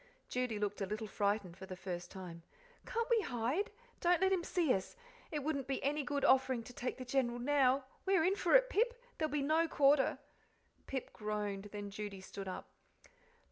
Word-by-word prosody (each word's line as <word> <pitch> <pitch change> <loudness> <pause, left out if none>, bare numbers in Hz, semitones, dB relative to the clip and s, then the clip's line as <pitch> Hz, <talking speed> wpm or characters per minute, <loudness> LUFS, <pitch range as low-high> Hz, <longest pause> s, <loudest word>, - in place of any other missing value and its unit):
Judy 250 -3 -1
looked 205 0 -2
a 195 - 0
little 215 +2 -3
frightened 200 -3 0
for 190 +1 -9
the 185 - -6
first 180 -1 -5
time. 175 -3 -8 0.5
"Can't 465 -1 -1
we 460 -2 +5
hide? 260 - -1 0.3
Don't 350 -1 +4
let 380 +1 +3
him 360 -2 +1
see 335 -7 +2
us. 190 - -3 0.3
It 300 -3 -3
wouldn't 280 -3 -1
be 275 - -2
any 295 +2 +1
good 285 0 0
offering 260 -2 +4
to 245 - -11
take 250 +1 -3
the 255 - -6
General 245 -2 +1
now. 270 +1 +3 0.2
We're 380 -4 +4
in 375 +4 +3
for 360 +2 +3
it - - +9
now, - - -13
Pip 480 +2 +2 0.2
there'll 310 -1 0
be 290 -1 0
no 320 +3 +3
quarter." 280 -3 +4 0.7
Pip 265 -1 -4
groaned; 210 -2 -3
then 205 -1 -6
Judy 205 -1 -5
stood 195 +1 -7
up. 185 - -5
255 Hz, 195 wpm, -36 LUFS, 205-310 Hz, 0.7 s, it